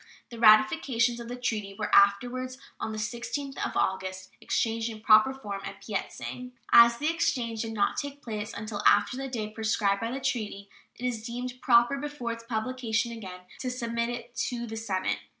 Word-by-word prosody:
The 235 - -8
ratifications 230 +2 +5
of 235 - -7
the 245 - -5
treaty 215 -5 -3
were - - -3
afterwards, 245 +6 +3 0.2
on - - -3
the 215 - -5
16th 245 +6 -4
of - - -2
August, 185 0 -2
exchanged 225 0 0
in 220 -1 -8
proper 215 +3 +6
form 205 -7 -6
at - - -8
Peit - - -3
sang. 250 0 -7 0.2
As 235 0 +8
the 305 +5 0
exchange 235 -9 -1
did 225 -1 -4
not 205 -2 +1
take 285 0 -5
place 215 -1 -4
until 215 -1 -5
after 205 +4 +4
the 270 +1 -4
day 220 -5 -4
prescribed 215 -2 0
by 230 - -1
the 260 +3 -3
treaty, 205 -6 -3 0.3
it 250 - -6
is 240 -3 -1
deemed 245 +2 -5
proper 240 +2 +5
before 290 -5 -4
its 230 0 -7
publication 235 0 -1
again 190 -6 -8 0.2
to 255 - -2
submit 235 -1 -2
it 240 0 -7
to 240 -1 -4
the 225 -1 -6
Senate. 205 -4 -1
230 Hz, 185 wpm, -28 LUFS, 215-250 Hz, 0.3 s, As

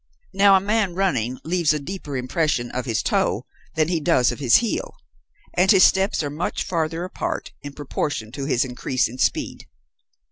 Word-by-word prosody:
Now 195 0 +6
a - - +5
man, 200 -2 0
running, 130 - 0
leaves 165 -2 +1
a 150 - -2
deeper 145 -2 -6
impression 125 -1 -1
of 125 0 -4
his 115 -3 -1
toe - - 0 0.3
than 155 -1 +2
he 170 -1 0
does 125 -4 +2
of - - -7
his 130 -5 +4
heel, 235 -2 0 0.6
and 185 +2 +2
his 195 -4 +7
steps 190 -3 +3
are 145 - -3
much 155 +4 -3
farther 165 -1 -2
apart 185 - -4
in 145 0 -8
proportion 140 -5 -4
to 135 +2 -5
his 135 -3 +1
increase 130 0 -1
in 125 +3 -10
speed. - - -1
150 Hz, 180 wpm, -22 LUFS, 130-185 Hz, 0.6 s, his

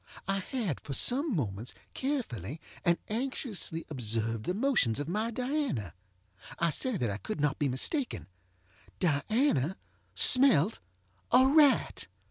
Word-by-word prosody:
I 195 0 0
had, 200 - -3
for 140 - -6
some 260 - +1
moments, 110 - -3 0.2
carefully 160 - -3 0.2
and 170 -2 +3
anxiously 220 - -3
observed 115 -5 -3
the 180 - -1
motions 215 - +1
of 145 - -3
my 215 +6 -1
DianaŌĆöI 250 - -2 0.8
say 255 - -1
that 120 - -1
I 100 - -3
could 190 - -6
not 145 -1 0
be 145 - +1
mistakenŌĆöDiana 135 - -1 0.4
smelt 245 - +6 0.5
a 255 +2 +6
rat! 280 - +3
175 Hz, 115 wpm, -30 LUFS, -, 0.8 s, smelt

